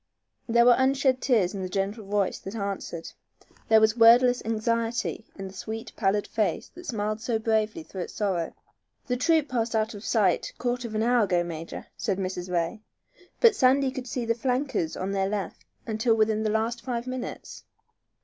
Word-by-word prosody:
There 235 +1 +5
were 245 - +8
unshed 265 -1 +2
tears 215 -8 +2
in 195 - -4
the 185 - -4
gentle 200 +4 -2
voice 200 -1 0
that 195 +3 -8
answered. 200 -5 -4 0.6
There 220 0 +6
was 220 0 +3
wordless 245 +2 +6
anxiety 230 +1 -1
in 195 -1 -6
the 190 - -11
sweet, 225 +4 -6
pallid 205 0 +1
face 215 -2 -1
that 350 +1 -12
smiled 215 -3 -2
so 225 0 0
bravely 220 +6 0
through 190 -11 -7
its - - -7
sorrow. 185 -6 -1 0.5
"The 250 - -1
troop 315 +4 +2
passed 235 -3 -1
out 220 +1 0
of 205 0 -9
sight 200 -8 +1
quarter 245 0 -2
of 220 - -7
an 215 - +1
hour 240 -2 +3
ago, 175 -3 +1
major," 165 -1 -7
said 195 -3 -1
Mrs. 185 -1 -4
Ray. 175 +5 -1 0.6
"But 460 -3 +6
Sandy 265 -1 +3
could 260 -1 -6
see 245 0 -3
the 230 - +2
flankers 250 - -1
on 190 +1 -3
their 195 -1 0
left 205 -2 -4 0.2
until 225 +1 +1
within 215 0 +2
the 215 - 0
last 225 +2 -1
five 240 -2 -3
minutes." 255 -1 -6
220 Hz, 185 wpm, -26 LUFS, 200-245 Hz, 0.6 s, were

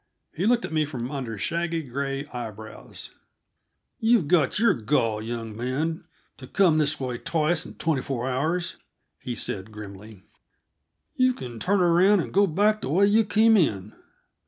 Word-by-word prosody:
He 185 +6 -1
looked 240 0 +2
at - - -7
me 155 -1 +2
from 130 -4 -5
under 125 -6 -4
shaggy, 170 - -2
gray 135 +1 -3
eyebrows. 110 -4 -8 0.9
"You've 225 -8 +3
got 155 -5 +2
your 230 +3 +4
gall, 115 -2 0
young 115 -1 -5
man, 135 +8 -2 0.3
to 130 - -11
come 170 -2 +3
this 150 0 +1
way 125 -3 -3
twice 160 0 0
in - - -12
twenty 155 -5 0
four 125 -1 -3
hours," 160 +7 -1 0.4
he 125 - -5
said 100 -1 -4
grimly. 105 -1 -11 0.9
"You 255 0 +3
can 120 - -8
turn 200 - +1
around 180 +4 +4
and - - -4
go 200 +1 +4
back 210 +6 +2
the - - -4
way 185 +7 +4
you 215 +2 +4
came 220 +2 +4
in." 110 - +1
150 Hz, 160 wpm, -25 LUFS, 120-180 Hz, 0.9 s, your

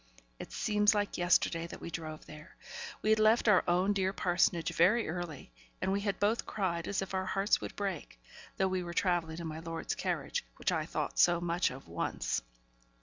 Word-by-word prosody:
It - - -8
seems 210 0 +2
like 205 -2 -1
yesterday 170 -1 +2
that - - -9
we 170 - -7
drove 155 -2 -6
there. 155 +2 -12 0.5
We 215 - +3
had 220 - +4
left 220 +2 +4
our 205 -4 +6
own 180 +3 +3
dear 190 -1 +1
parsonage 175 -3 +1
very 210 +8 +4
early, 160 - -5 0.3
and 190 - 0
we 200 +1 0
had 200 -1 -2
both 210 +3 +1
cried 170 -5 -2
as 195 -1 -1
if 195 - -8
our 190 0 -1
hearts 195 +2 +2
would - - -6
break, 195 - -4 0.4
though 190 - +2
we 185 -1 -1
were 175 -1 -6
travelling 170 -4 +1
in 170 - -5
my 160 0 -5
lord's 165 0 -4
carriage, 485 - -2
which - - -1
I - - -1
thought - - -3
so 175 -1 +5
much 175 +1 +1
of 130 -4 -10
once. 85 -6 -2
180 Hz, 200 wpm, -32 LUFS, 170-200 Hz, 0.5 s, our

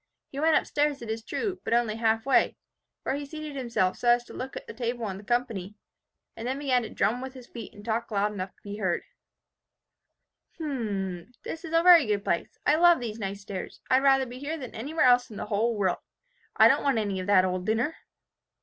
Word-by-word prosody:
He 275 - -5
went 315 +1 +4
up - - +3
stairs, 290 -3 0
it 220 - -4
is 225 0 -4
true, 390 - -3
but 230 - +1
only 235 -3 +1
half 225 0 +1
way, 275 - +3 0.5
where - - -1
he 285 +1 -3
seated 305 0 -7
himself 235 -8 0
so 245 - -3
as 240 0 +5
to - - -13
look 260 0 -6
at - - -8
the - - -8
table 235 0 -3
and 190 -1 -5
the - - -12
company, 220 -4 -2 0.6
and 225 - -5
then 260 +2 -1
began 265 -3 +2
to 220 - -6
drum 245 +3 0
with 260 0 -7
his 255 -2 -10
feet 230 -3 -9
and 205 0 -12
to 230 - -1
talk 230 +1 -1
loud 210 -1 0
enough 190 -2 -4
to - - -33
be 205 0 -6
heard, 185 -5 -1 1.5
"'H - - -12
m 275 -7 -2 0.3
n 170 - -17
h! 250 - -27
This 325 - -6
is 325 -1 -7
a 330 - +4
very 345 -7 +8
good 205 -1 0
place. 170 - -1
I 300 - +4
love 345 0 +6
these 230 -2 -5
nice 200 -1 -4
stairs. 195 -2 -7
I'd 260 +1 +5
rather 270 -1 +4
be 250 0 -9
here 300 +4 -3
than 260 -5 -8
anywhere 285 +7 0
else 245 0 +5
in 215 - -10
the - - -4
world. 205 -3 0 0.6
I - - +8
don't - - +4
want 275 -4 +2
any 200 -3 -1
of 185 - -5
that 190 -2 +5
old 185 +1 -2
dinner! 230 +9 +1
240 Hz, 240 wpm, -27 LUFS, 210-275 Hz, 1.5 s, very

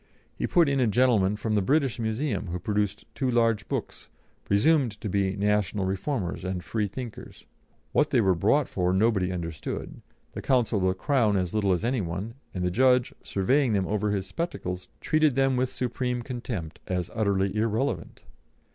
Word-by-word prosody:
He - - -2
put 170 -3 +4
in 140 -1 +1
a 125 - +3
gentleman 110 -4 +3
from 110 +1 -2
the 105 - +3
British 135 +3 +1
Museum, 110 0 -1
who 85 +1 -3
produced 105 +2 -1
two 130 - -1
large 115 -3 +2
books, - - -5 0.4
presumed 115 +1 +2
to - - -4
be 95 0 0
National 105 -1 +1
Reformers 95 -1 -2
and 90 -1 -3
Freethinkers; 110 +2 -5 0.5
what 150 - +2
they 130 - +3
were 95 -4 +4
brought 110 - +2
for 90 -1 0
nobody 95 -2 +2
understood, 85 -4 -5 0.3
the - - -6
counsel 120 -5 +2
for 95 - +1
the 95 - +2
Crown 110 -1 +2
as 90 -2 -1
little 105 -3 +2
as 90 +2 +1
any 125 -1 +1
one, 95 +6 -4 0.2
and 90 - -3
the 90 - +1
judge, 125 +3 +3
surveying 125 +6 +1
them 95 -2 +1
over 105 +1 0
his 100 -2 -1
spectacles, 95 - -4
treated 155 -4 +2
them 135 -1 +3
with 125 0 +1
supreme 125 -1 -2
contempt, 115 - -5
as 90 -2 -2
utterly 100 -3 +1
irrelevant. 115 +5 -1
105 Hz, 175 wpm, -27 LUFS, 95-125 Hz, 0.5 s, put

